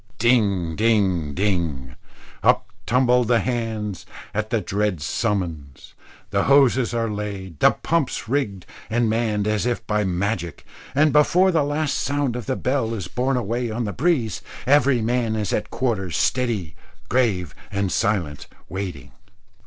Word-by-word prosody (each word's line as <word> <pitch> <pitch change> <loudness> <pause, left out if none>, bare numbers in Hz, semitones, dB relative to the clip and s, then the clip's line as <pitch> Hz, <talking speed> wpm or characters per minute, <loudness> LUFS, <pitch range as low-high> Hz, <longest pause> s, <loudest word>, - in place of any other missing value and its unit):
Ding, 100 -9 +2
ding, 95 -9 +1
ding 85 -10 -1 0.5
up - - +3 0.2
tumble 125 0 +4
the 120 0 +3
hands 110 -4 -3 0.3
at 110 +2 -2
the 115 -1 +1
dread 100 -1 -1
summons. 80 - -3 0.4
The 100 -1 +1
hoses 135 -3 +4
are 115 -1 0
laid, 100 -6 -5
the - - +7
pumps 165 -8 -1
rigged 110 -8 -1 0.2
and 120 +1 +1
manned 110 -2 0
as 110 +2 0
if 120 -2 -2
by 105 -1 +1
magic, 90 -1 -2 0.3
and 150 +1 +4
before 180 +6 +4
the 165 -3 +2
last 145 +1 -1
sound 140 -3 -1
of 120 -4 -5
the 130 - 0
bell 125 -4 -1
is 95 -6 -5
borne 125 +6 0
away 120 +1 -2
on 115 +2 -2
the 100 - -3
breeze, 130 - 0 0.2
every 130 -3 +4
man 115 -1 0
is 105 -3 -2
at 105 - -1
quarters, 105 -9 -1
steady, 115 -10 0 0.3
grave, 100 - +1 0.2
and 100 -1 -1
silent 95 -10 -1 0.2
waiting. 90 -8 -5
110 Hz, 145 wpm, -23 LUFS, 95-125 Hz, 0.5 s, the